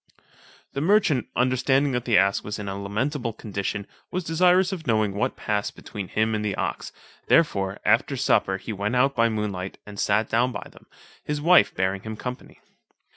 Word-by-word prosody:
The 140 - -2
merchant 165 - +3
understanding 130 +2 +2
that 125 -1 -2
the 115 -3 +4
ass 100 +1 +3
was 105 - -5
in 105 - -6
a 95 - -3
lamentable 115 +5 -2
condition, 100 -1 -4 0.2
was 180 0 -3
desirous 180 +3 +3
of 175 -6 -6
knowing 110 -3 +2
what 100 - -1
passed 105 -1 -2
between 100 -3 -7
him 110 +4 0
and 105 -1 -1
the 105 -2 -1
ox, - - -3 0.4
therefore 100 - +2
after 115 +5 +2
supper 95 -5 +2
he 110 - -6
went 105 +4 -2
out 135 +2 +3
by 115 0 +3
moonlight, 100 -4 -3
and 105 -1 -9
sat 110 +2 +2
down 120 +3 +1
by 100 - -6
them, - - -19 0.4
his 150 0 -2
wife 175 +4 +5
bearing 95 +1 0
him 110 +1 -7
company. 125 +2 -7
110 Hz, 180 wpm, -25 LUFS, 100-135 Hz, 0.4 s, wife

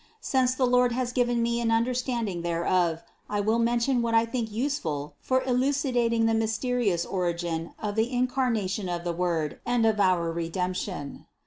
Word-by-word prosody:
Since 260 -8 +1
the 255 - +2
Lord 250 -1 +3
has 245 0 -1
given 245 -1 +1
me 235 0 0
an 230 - 0
understand 240 0 0
ing 175 -3 -4
thereof, 170 0 0 0.3
I 205 - -1
will 220 +3 +1
mention 240 +2 +2
what 230 -1 0
I 225 0 +5
think 230 -1 -3
useful 205 - -2
for 260 0 +1
eluci 265 +2 0
dating 230 -1 +2
the 225 - +2
mysterious 225 -4 0
origin 170 -3 -2
of 210 -1 -3
the 225 +3 +1
Incarnation 245 -6 0
of 175 -1 -3
the 175 -1 -2
Word 170 -3 -1
and 240 -1 +1
of 220 -2 +2
our 180 -4 +2
Redemption. 175 -1 -4
225 Hz, 175 wpm, -27 LUFS, 180-245 Hz, 0.3 s, I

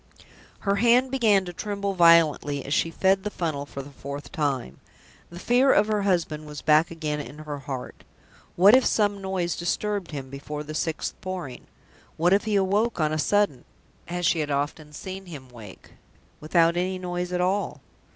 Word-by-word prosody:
Her 200 -1 +1
hand 240 +4 +4
began 215 -7 +3
to 175 - -7
tremble 200 +1 -3
violently 165 -5 +4
as 140 - -2
she 165 - +2
fed 190 +3 +2
the 210 - -2
funnel 155 -7 -3
for 140 - -7
the 145 - -12
fourth 140 +1 -8
time. 140 - -2 0.5
The 170 - -11
fear 250 +8 +3
of 205 - +4
her 210 -1 0
husband 165 -6 -1
was 150 -1 -8
back 155 +2 +4
again 155 -3 -3
in 145 0 -8
her 150 -2 -6
heart. 135 -2 -7 0.5
What 195 +5 +7
if 260 - +5
some 205 -3 +1
noise 190 -3 -2
disturbed 200 +2 -2
him 135 -4 -7
before 150 +2 -6
the 155 +1 -8
sixth 155 +1 -2
Pouring? 180 -9 -6 0.5
What 175 +3 +3
if 200 - +2
he 210 -2 +1
woke 200 +3 +1
on 155 -1 +1
a 155 - -1
sudden 205 -6 +1 0.4
(as 175 0 -3
she 170 - +2
had 150 -1 -2
often 145 +2 -2
seen 190 +5 -8
him 140 -6 -10
wake) 110 -6 -13 0.5
without 165 +2 +2
any 185 +1 -1
noise 180 -1 -4
at 180 - -1
all? 190 +3 0
170 Hz, 180 wpm, -25 LUFS, 150-195 Hz, 0.5 s, What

